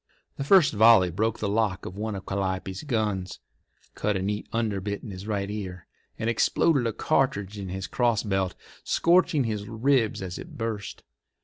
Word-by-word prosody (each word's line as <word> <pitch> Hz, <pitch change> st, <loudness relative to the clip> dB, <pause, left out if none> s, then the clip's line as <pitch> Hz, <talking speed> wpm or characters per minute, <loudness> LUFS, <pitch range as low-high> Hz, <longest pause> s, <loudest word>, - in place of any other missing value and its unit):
The 140 Hz, -, -2 dB
first 175 Hz, +1 st, +5 dB
volley 110 Hz, -4 st, +6 dB
broke 110 Hz, +6 st, 0 dB
the 105 Hz, -, -2 dB
lock 100 Hz, -3 st, 0 dB
of 90 Hz, -, -7 dB
one 105 Hz, +1 st, -3 dB
of 95 Hz, -, -7 dB
Calliope's 95 Hz, -1 st, -3 dB
guns, 105 Hz, -, -2 dB, 0.6 s
cut 105 Hz, -2 st, -1 dB
a -, -, -3 dB
neat 105 Hz, +1 st, -3 dB
underbit 105 Hz, -3 st, -2 dB
in 110 Hz, -, -7 dB
his 95 Hz, +2 st, -8 dB
right 100 Hz, -2 st, -1 dB
ear, 95 Hz, -4 st, -6 dB, 0.3 s
and 110 Hz, -, -2 dB
exploded 125 Hz, +3 st, +2 dB
a -, -, 0 dB
cartridge 105 Hz, -7 st, 0 dB
in 95 Hz, -2 st, -5 dB
his 95 Hz, +1 st, -4 dB
crossbelt, 105 Hz, -6 st, 0 dB, 0.3 s
scorching 170 Hz, -4 st, +3 dB
his 105 Hz, -3 st, -3 dB
ribs 115 Hz, -2 st, +1 dB
as 90 Hz, -1 st, -5 dB
it -, -, -10 dB
burst. 110 Hz, -3 st, -4 dB
105 Hz, 170 wpm, -26 LUFS, 95-115 Hz, 0.6 s, volley